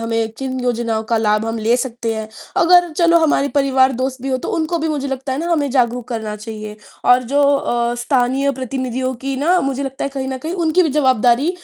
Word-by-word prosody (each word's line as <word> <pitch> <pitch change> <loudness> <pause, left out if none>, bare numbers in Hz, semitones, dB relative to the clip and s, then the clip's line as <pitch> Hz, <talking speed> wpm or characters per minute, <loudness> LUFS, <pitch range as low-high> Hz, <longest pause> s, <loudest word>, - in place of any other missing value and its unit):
हमें 230 -1 -1
किन 260 -1 -3
योजनाओं 235 -2 -1
का - - +4
लाभ 215 0 +1
हम 225 0 -3
ले 225 +2 +2
सकते 235 -3 -3
हैं। 220 0 -5 0.3
अगर 355 0 +5
चलो 335 +1 +4
हमारे 295 -3 +2
परिवार-दोस्त 265 -2 +1
भी 270 - -3
हों, 260 -1 0
तो - - -6
उनको 330 +1 -1
भी, 320 0 -2
मुझे 285 -3 -2
लगता 270 0 -3
है 260 - -2
ना, 340 +3 -2
हमें 290 -4 0
जागरूक 245 -2 0
करना 220 -3 -4
चाहिए 215 0 -8 0.3
और 250 +1 +5
जो 280 +4 +1
अ, 240 -4 +1
स्थानीय 260 +2 +1
प्रतिनिधियों 255 0 -3
की 270 +3 -4
ना, 340 +7 +2
मुझे 275 0 -2
लगता 270 -1 -4
है, - - -1
कहीं 270 -1 -4
न 265 - -3
कहीं 315 +6 -5
उनकी 320 +3 +3
भी 330 - +1
जवाबदारी 260 0 +3
260 Hz, 215 wpm, -18 LUFS, 235-280 Hz, 0.3 s, अगर